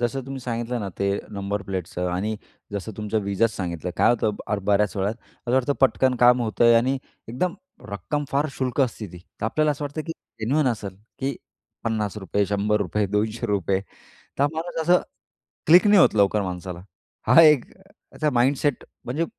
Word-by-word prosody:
जसं 120 +3 -1
तुम्ही 135 0 -6
सांगितलं 120 0 -3
ना, 100 - -3
ते 100 0 +1
नंबर 100 0 -3
प्लेटचं 90 -2 -4
आणि 105 +4 -2 0.4
जसं 100 +2 -4
तुमचं 105 0 -1
विजाच 100 +3 +1
सांगितलं, 90 -2 -4
काय - - +5
होतं 120 -2 +1 0.2
आर 105 - +1
बऱ्याच 105 0 +2
वेळात 100 +3 0
असं 120 +1 -9
वाटतं 130 +2 +2
पटकन 130 -1 +3
काम 125 0 +6
होतंय 115 +1 +4
आणि 130 +4 +2 0.3
एकदम 170 +10 -1 0.4
रक्कम 140 +10 -3
फार 140 +2 +1
क्षुल्लक 130 -2 -2
असते 115 -4 0
ती, 90 - -9 0.2
तर - - -2
आपल्याला 155 +6 +1
असं 145 0 -3
वाटतं, 145 +2 -4
की 165 - -3 0.3
जेन्युइन 135 +7 +1
असेल, 105 -5 -4 0.2
की 135 -1 -2 0.5
₹50 105 -3 -1
₹100 105 0 0
₹200 105 -2 0 0.6
तर 140 - +4
माणूस 165 +1 -4
असं 175 +3 +4 0.7
क्लिक 175 +6 +7
नाही 205 -2 +6
होत - - +5
लवकर 100 0 +3
माणसाला. 90 -1 -5 0.5
हा 135 +8 +8
एक 150 -6 +6
त्याचा 190 -5 -5
माइंडसेट 135 +3 +1 0.2
म्हणजे 150 +7 -1
115 Hz, 165 wpm, -24 LUFS, 100-135 Hz, 0.7 s, हा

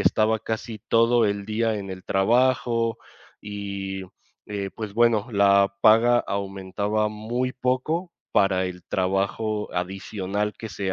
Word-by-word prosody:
estaba 110 +1 +3
casi 110 0 -5
todo 115 0 +4
el 100 0 -2
día 110 +1 0
en 100 -2 -6
el 95 -1 -8
trabajo, 115 +2 +2 0.4
y, 100 -2 -5 0.4
eh, 100 -2 -4
pues 105 -3 -6
bueno, 115 -2 +3
la 100 -1 +4
paga 115 +3 +6
aumentaba 100 +2 -2
muy 120 +4 -3
poco 130 +8 -1 0.2
para 95 -2 +3
el 90 -1 -8
trabajo 100 +4 -1
adicional 95 +3 -3
que 110 - -6
se 95 -1 -3
105 Hz, 125 wpm, -24 LUFS, 100-115 Hz, 0.4 s, paga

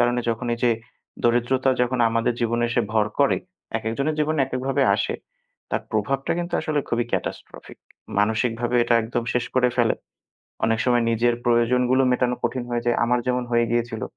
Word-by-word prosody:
কারণে 120 0 +2
যখন 115 +2 -3
এই - - -10
যে, 120 - +5 0.5
দরিদ্রতা 120 +3 +2
যখন 125 +1 0
আমাদের 115 +1 +1
জীবনে 120 0 +1
এসে 120 - +2
ভর 110 -1 +3
করে, 140 - +4 0.4
একেক 110 0 -3
জনের 150 +2 0
জীবনে 155 0 +1
একেকভাবে 135 +1 -1
আসে। 100 -2 -1 0.6
তার - - -1
প্রভাবটা 135 +6 -1
কিন্তু 175 0 -3
আসলে 155 -2 0
খুবই 120 0 0
catastrophic - - -5 0.4
মানসিকভাবে 115 +3 +1
এটা 120 - +2
একদম 115 +1 -2
শেষ 125 - 0
করে 125 -1 +4
ফেলে। 120 -3 +3 0.7
অনেক 115 0 +2
সময় 120 -1 +3
নিজের 120 +1 +2
প্রয়োজনগুলো 125 +2 +3
মেটানো 125 -1 +1
কঠিন 120 +1 -1
হয়ে 120 0 -2
যায়। 120 - +2
আমার 125 +1 +2
যেমন 125 0 +1
হয়ে 120 0 +4
গিয়েছিল। 115 -2 -1
120 Hz, 170 wpm, -23 LUFS, 115-125 Hz, 0.7 s, যে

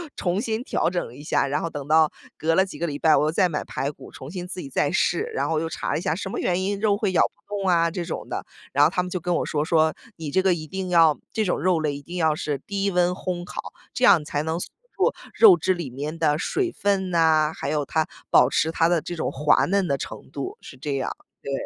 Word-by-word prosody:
重 180 +1 -1
新 225 +1 -2
调 - - 0
整 175 -1 -2
了 120 - -13
一 145 - -11
下， 140 - +1
然 145 - 0
后 165 - -2
等 145 -2 -6
到 155 0 +4 0.3
隔 165 +1 +1
了 190 - +5
几 185 - -9
个 170 - -2
礼 145 -3 -4
拜， 160 - +5
我 - - +3
又 155 - +1
再 180 +2 +2
买 150 - -2
排 135 +2 -3
骨， 140 -2 -11
重 130 - -10
新 180 +1 -6
自 180 0 -6
己 135 - -8
再 145 +3 +1
试， 195 - +1
然 - - -1
后 160 - +1
我 - - +2
又 165 - -2
查 - - -3
了 - - +1
一 - - -3
下 155 - 0
“什 190 +3 -4
么 - - -4
原 180 +1 0
因 200 +1 -1
肉 205 -1 +2
会 205 -3 0
咬 - - +5
不 - - -4
动 195 -1 -2
啊” 170 -2 +3
这 170 0 -4
种 - - -6
的， - - -4 0.3
然 - - +5
后 - - +3
他 180 - +1
们 180 - -5
就 185 - -3
跟 175 +2 -1
我 - - +1
说， 150 0 -1
说： 160 -1 +3 0.3
“你 160 -3 -5
这 190 +6 +2
个 190 - +4
一 155 -2 -5
定 190 +2 -4
要 165 -3 +5 0.2
这 220 - +1
种 180 - 0
肉 180 -2 +2
类 150 -2 -1
一 145 - -8
定 175 +5 -9
要 160 -3 +2
是 145 -3 -3
低 200 0 -1
温 180 -1 +3
烘 180 -1 -4
烤， - - -7 0.2
这 255 - +1
样 160 -4 +6
才 145 0 -2
能 160 +2 -2
锁 - - -6 0.2
住 - - +2 0.2
肉 405 -6 +8
质 185 - +1
里 170 -6 -5
面 145 +5 -5
的 155 -2 +2
水 360 - -1
分 195 -2 0
呐， 160 -2 +3
还 140 - -4
有 150 -2 0
它 160 -1 0 0.2
保 125 +1 +6
持 160 +3 +1
它 165 0 +2
的 175 -2 +3
这 175 - -6
种 160 - -2
滑 150 +2 +3
嫩 195 -1 +1
的 140 - +1
程 - - -8
度。 140 - -5
“是 - - -11
这 140 +1 -3
样， 135 - -2 0.3
对。 140 - -6
165 Hz, 300 characters per minute, -24 LUFS, 150-185 Hz, 0.3 s, 肉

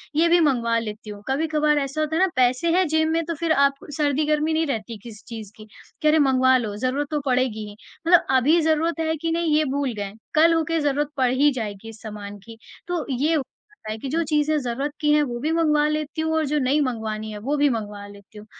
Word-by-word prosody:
ये 325 +2 +4
भी 345 +1 +5
मँगवा 240 -7 +2
लेती 215 -1 -7
हूँ। 205 -1 -8
कभी-कभार 300 +2 +1
ऐसा 275 +2 -3
होता 310 +1 -1
है - - +1
ना 380 - +5
पैसे 255 +5 +2
हैं 375 - +3
जेब 315 +1 +1
में 330 +1 +1
तो 335 - -3
फ़िर 330 +1 -2 0.2
आप 275 - -6 0.2
सर्दी-गर्मी 300 +1 +1
नहीं 320 +1 +1
रहती 225 -3 -4
किसी 220 -4 -11
चीज़ 220 -4 -8
की, 215 - -12 0.4
कि 305 - +2
अरे! 310 +1 +5
मँगवा 260 -2 +4
लो, 215 -5 -3
ज़रूरत 260 +5 -1
तो 300 - 0
पड़ेगी 250 -5 0
ही। 205 - -12 0.3
मतलब 350 -1 +6
अभी 300 +7 +4
ज़रूरत 320 +1 +1
है 320 0 0
कि 330 -1 -1
नहीं 330 -2 +1
ये 310 - +2
भूल 280 -4 -1
गए, 200 -1 -5 0.2
कल 325 +2 +5
हो 325 -1 +2
के 330 - +1
ज़रूरत 290 0 0
पड़ 255 -2 +2
ही 285 +3 +4
जाएगी 220 -3 -6
इस 220 0 -13
सामान 205 -2 -8
की। 225 -1 -11 0.3
तो 350 -2 -2
ये 285 +6 +1
हो 305 - +1 0.4
जाता 215 - -4
है 215 - -4
कि 270 - -5
जो 325 +5 0
चीज़ें 300 0 +2
ज़रूरत 270 +3 -3
की 295 -1 +3
हैं 300 - +4
वो 240 -4 -4
भी 305 +5 -1
मँगवा 300 -2 +2
लेती 305 +1 -2
हूँ 320 0 -1
और 315 -1 +1
जो 295 +2 -1
नहीं 275 +2 +2
मँगवानी 220 -4 -3
है 210 - -6
वो 275 +8 -2
भी 290 0 +4
मँगवा 210 -4 -4
लेती 205 +1 -15
हूँ। 210 - -11
280 Hz, 245 wpm, -23 LUFS, 230-310 Hz, 0.4 s, मतलब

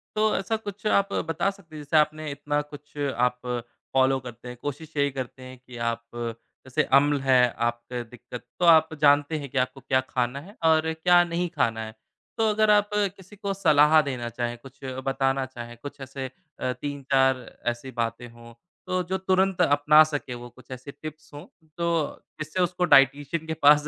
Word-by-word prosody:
तो 215 0 +2
ऐसा 195 +4 -1
कुछ 210 -1 -9
आप 200 -1 +2
बता 165 +5 0
सकते 195 -5 -16
हैं? 150 - -7
जैसे 155 +2 +1
आपने 155 0 +1
इतना 145 +1 -1
कुछ 150 0 -13
आप 125 -3 0 0.5
फ़ॉलो 135 0 +3
करते 125 -1 -10
हैं, 125 0 -8
कोशिश 150 +2 -6
यही 140 -1 +2
करते 130 -1 -6
हैं 130 0 -10
की 125 -1 -12
आप 115 0 -2 0.6
जैसे 130 - +1
अम्ल 145 0 +3
है, 130 -2 +4 0.2
आपके 120 +1 -2
दिक्कत 120 +1 -10 0.2
तो 175 - +2
आप 160 -1 +6
जानते 145 +1 +4
हैं 140 -2 -7
की 140 - -5
आपको 130 +1 -9
क्या 130 0 +2
खाना 125 +1 -1
है 200 +7 -14
और 160 0 +3
क्या 175 +2 +5
नहीं 175 0 -2
खाना 110 -1 +1
है। 110 0 -10 0.4
तो 220 -1 +3
अगर 215 0 +2
आप 205 0 +4 0.3
किसी 190 +2 -15
को 200 -1 -3
सलाह 155 -4 +5
देना 130 -5 -4
चाहें, 120 0 -3
कुछ 135 +2 -15 0.3
बताना 135 0 +1
चाहें, 120 -2 -9
कुछ 145 0 -8
ऐसे 135 0 -6 0.3
3-4 135 -1 0 0.3
ऐसी 120 +3 -9
बातें 115 +1 -3
हों 115 0 -14 0.3
तो 185 0 0
जो 190 - 0
तुरंत 190 -1 +1
अपना 150 0 +6
सकें 145 -5 -4
वो 120 0 -9
कुछ 130 +2 -18
ऐसे 130 +2 -7
टिप्स 155 0 -9
हों 145 - -9 0.3
तो 170 - -1 0.6
इससे 155 +5 -2
उसको 180 0 0
डायटीशियन 145 +4 +3
के 160 - -1
पास 150 -1 +5
145 Hz, 185 wpm, -26 LUFS, 130-160 Hz, 0.6 s, आप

